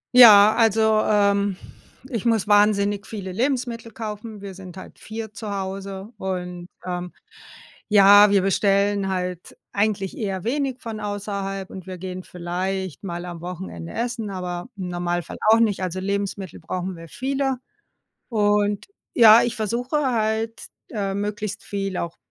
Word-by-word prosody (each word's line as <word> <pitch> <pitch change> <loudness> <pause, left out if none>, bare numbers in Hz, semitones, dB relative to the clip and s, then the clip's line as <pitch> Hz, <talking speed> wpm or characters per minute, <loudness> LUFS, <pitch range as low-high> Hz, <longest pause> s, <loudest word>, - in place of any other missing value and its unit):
Ja, 215 -4 +10
also, 220 -1 +4
ähm, 200 -1 +2 0.5
ich 230 -6 -3
muss 225 -4 +2
wahnsinnig 205 -1 +3
viele 195 -4 -6
Lebensmittel 235 +1 -2
kaufen. 215 -1 -6
Wir 200 -1 -7
sind 185 -2 -10
halt 185 - -11
4 220 0 -7
zu 210 +1 -6
Hause 195 +1 -5
und, 180 -2 -4 0.2
ähm, 180 -1 -4 0.8
ja, 205 0 +8
wir 200 -1 +4
bestellen 200 +1 +2
halt 180 -2 -4 0.2
eigentlich 200 -2 0
eher 195 -4 -3
wenig 265 +1 -1
von 225 -2 -6
außerhalb 200 -2 -4
und 190 -1 -9
wir 185 -1 -6
gehen 185 0 -6
vielleicht 180 +1 -4
mal 175 -2 -4
am 175 -1 -7
Wochenende 175 -1 -7
essen, 235 -2 -3
aber 180 0 -5
im 185 -2 -4
Normalfall 175 0 -3
auch 225 +1 +7
nicht, 210 -4 +1
also, 185 0 -2
Lebensmittel 200 -2 -3
brauchen 180 +2 -4
wir 165 0 -10
viele. 270 - -1 0.7
Und, 205 - +1 0.3
ja, 225 -1 +8
ich 240 - -1
versuche 235 +6 -1
halt, 220 0 -1 0.2
äh, 195 -3 -2
möglichst 205 0 -3
viel 195 -2 -3
auch 170 0 -4
200 Hz, 145 wpm, -23 LUFS, 185-220 Hz, 0.8 s, Ja